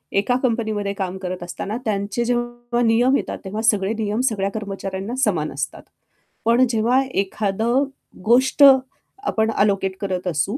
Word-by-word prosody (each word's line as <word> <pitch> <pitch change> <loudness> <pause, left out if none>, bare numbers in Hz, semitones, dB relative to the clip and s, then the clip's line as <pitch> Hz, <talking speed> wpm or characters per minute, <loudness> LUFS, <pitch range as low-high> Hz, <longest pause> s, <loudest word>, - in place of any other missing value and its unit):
एका 210 +5 +2
कंपनीमध्ये 215 -4 -1
काम 190 -1 -4
करत 185 -1 -5
असताना 200 +5 -5
त्यांचे 205 +2 -1
जेव्हा 240 0 -2
नियम 240 +4 +4
येतात, - - -4
तेव्हा 210 +3 -4
सगळे 210 -2 +2
नियम 210 +1 -1
सगळ्या 200 -2 -1
कर्मचाऱ्यांना 195 +1 -5
समान - - +1
असतात. - - -4 0.6
पण 240 +3 +5
जेव्हा 240 +4 +2
एखादं 220 +3 0 0.4
गोष्ट 260 +5 +4 0.6
आपण 220 0 +1
अलोकेट 195 -2 +1
करत 185 -2 -3
असू, 180 - 0
215 Hz, 135 wpm, -21 LUFS, 195-240 Hz, 0.6 s, पण